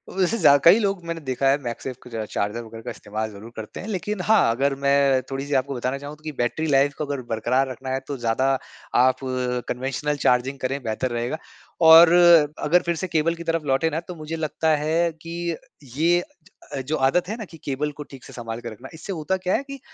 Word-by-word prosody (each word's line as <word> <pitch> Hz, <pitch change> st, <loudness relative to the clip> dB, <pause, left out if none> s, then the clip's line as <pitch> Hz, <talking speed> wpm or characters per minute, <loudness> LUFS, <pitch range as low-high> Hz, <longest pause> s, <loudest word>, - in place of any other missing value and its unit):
वैसे 195 Hz, +4 st, +1 dB
ज़्या 145 Hz, -6 st, +6 dB
कई 175 Hz, +5 st, +8 dB
लोग 195 Hz, -4 st, -1 dB
मैंने 165 Hz, -1 st, -4 dB
देखा 135 Hz, -1 st, -1 dB
है 135 Hz, -, +4 dB
मैगसेफ 125 Hz, +2 st, -5 dB
का 115 Hz, -3 st, -5 dB
चार्जर 105 Hz, +2 st, -2 dB
वग़ैरह 115 Hz, 0 st, -10 dB
का 125 Hz, -, -5 dB
इस्तेमाल 110 Hz, +1 st, -5 dB
ज़रूर 105 Hz, +3 st, -11 dB
करते 110 Hz, -1 st, -8 dB
हैं। 200 Hz, -, -7 dB
लेकिन 205 Hz, 0 st, -3 dB
हाँ, 210 Hz, -, +4 dB
अगर 135 Hz, +4 st, 0 dB
मैं 140 Hz, -1 st, +3 dB
थोड़ी-सी 135 Hz, +2 st, -3 dB
आपको 135 Hz, +1 st, -5 dB
बताना 130 Hz, +2 st, -2 dB
चाहूँ 145 Hz, +2 st, -8 dB
त -, -, -26 dB
की 155 Hz, -, -4 dB
बैटरी 140 Hz, +5 st, -1 dB
लाइफ़ 140 Hz, 0 st, +3 dB
को 155 Hz, -, -2 dB
अगर 140 Hz, -2 st, -3 dB
बरकरार 125 Hz, +4 st, +1 dB
रखना 130 Hz, +1 st, -7 dB
है 130 Hz, 0 st, 0 dB
तो 140 Hz, -, -4 dB
ज़्यादा 120 Hz, +2 st, 0 dB, 0.5 s
आप 130 Hz, +1 st, +4 dB, 0.5 s
कन्वेंशनल 135 Hz, +4 st, -2 dB
चार्जिंग 130 Hz, +2 st, +2 dB
करें 135 Hz, +2 st, -2 dB
बेहतर 115 Hz, +3 st, -2 dB
रहेगा 120 Hz, +5 st, -2 dB, 0.5 s
और 165 Hz, +1 st, +10 dB, 0.6 s
अगर 175 Hz, +4 st, +4 dB
फिर 170 Hz, 0 st, 0 dB
से 185 Hz, +3 st, -3 dB
केबल 165 Hz, 0 st, +1 dB
की 170 Hz, -, -8 dB
तरफ 165 Hz, -1 st, -1 dB
लौटे 140 Hz, +4 st, +2 dB
ना, 160 Hz, 0 st, -2 dB
तो 175 Hz, +1 st, -9 dB
मुझे 155 Hz, 0 st, -6 dB
लगता 160 Hz, 0 st, -1 dB
है 160 Hz, +3 st, +1 dB
कि 170 Hz, 0 st, -4 dB, 0.4 s
ये 170 Hz, +4 st, +3 dB, 0.6 s
अ, 135 Hz, -, -2 dB
जो 145 Hz, +5 st, -2 dB
आदत 175 Hz, +6 st, +1 dB
है 220 Hz, -, -2 dB
ना 220 Hz, -, -6 dB
कि 165 Hz, -, -14 dB
केबल 145 Hz, +2 st, -2 dB
को -, -, -4 dB
ठीक 135 Hz, -2 st, -11 dB
से -, -, -12 dB
सँभाल 115 Hz, -1 st, -6 dB
के 120 Hz, -, -6 dB
रखना 120 Hz, +5 st, -11 dB
इससे 165 Hz, +5 st, -6 dB
होता 175 Hz, +3 st, -1 dB
क्या 185 Hz, 0 st, -1 dB
है -, -, -1 dB
कि 275 Hz, 0 st, -9 dB
140 Hz, 225 wpm, -23 LUFS, 125-165 Hz, 0.6 s, और